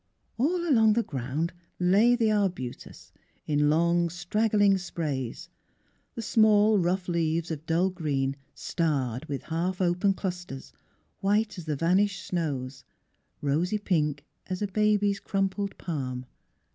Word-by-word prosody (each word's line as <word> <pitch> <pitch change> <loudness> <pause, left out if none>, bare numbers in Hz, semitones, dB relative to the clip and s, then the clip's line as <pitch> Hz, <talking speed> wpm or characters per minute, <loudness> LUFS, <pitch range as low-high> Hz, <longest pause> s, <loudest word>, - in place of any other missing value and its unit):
All 345 +6 +1
along 225 -7 +5
the 230 +2 +1
ground 140 - -3 0.3
lay 200 +7 +5
the 225 -3 +2
arbutus 185 - -3 0.3
in 150 -1 +2
long, 170 +2 +2
straggling 205 +3 +2
sprays, 145 -9 -4 0.7
the 230 - -4
small 215 -1 +4
rough 180 +1 0
leaves 165 -1 0
of 155 0 -6
dull 175 +3 +2
green 140 -6 -1 0.2
starred 140 -6 -1
with 140 -3 -4
half 175 +3 -2
open 185 +2 +2
clusters, 180 -9 -6 0.5
white 210 0 +1
as 170 - -8
the 155 -2 -1
vanished 185 +6 +1
snows, 135 -6 -3 0.6
rosy 160 +8 +1
pink 150 -8 0 0.2
as 185 +2 -3
a - - 0
baby's 205 0 +2
crumpled 195 0 -2
palm. 130 -6 -4
175 Hz, 125 wpm, -27 LUFS, 150-205 Hz, 0.7 s, along